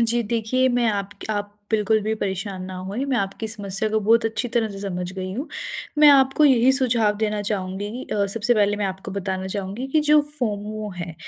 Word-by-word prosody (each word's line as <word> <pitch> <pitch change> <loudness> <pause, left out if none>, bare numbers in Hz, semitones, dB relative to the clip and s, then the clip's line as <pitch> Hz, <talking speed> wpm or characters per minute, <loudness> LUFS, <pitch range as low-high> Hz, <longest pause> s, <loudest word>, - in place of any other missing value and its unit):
जी 235 +1 +2
देखिए, 235 +4 +1
मैं 245 -1 +2
आपक 200 +1 -4
आप 205 -1 -3 0.2
बिल्कुल 220 0 +2
भी 215 +1 -1
परेशान 190 -2 -3
ना 185 0 -7
होएँ 225 +8 -2
मैं 275 -2 0
आपकी 200 +1 -2
समस्या 205 -1 -2
को 220 0 +1
बहुत 225 +2 +3
अच्छी 225 +2 -1
तरह 230 -1 0
से 195 - -8
समझ 180 -2 -4
गई 185 -1 -5
हूँ। 275 +7 -4 0.5
मैं 300 -1 +8
आपको 270 +1 +5
यही 260 -2 +5
सुझाव 230 -5 +2
देना 210 -1 -1
चाहूँगी 205 +3 -3
अ, 200 -1 +1
सबसे 230 +4 +1
पहले 205 -1 +2
मैं 205 -1 -1
आपको 190 +1 -6
बताना 190 -1 -3
चाहूँगी 200 +6 -4
कि 310 - +6
जो 300 0 +7 0.2
फोमो 215 -2 -3
है 170 -2 -6
215 Hz, 200 wpm, -23 LUFS, 195-235 Hz, 0.5 s, मैं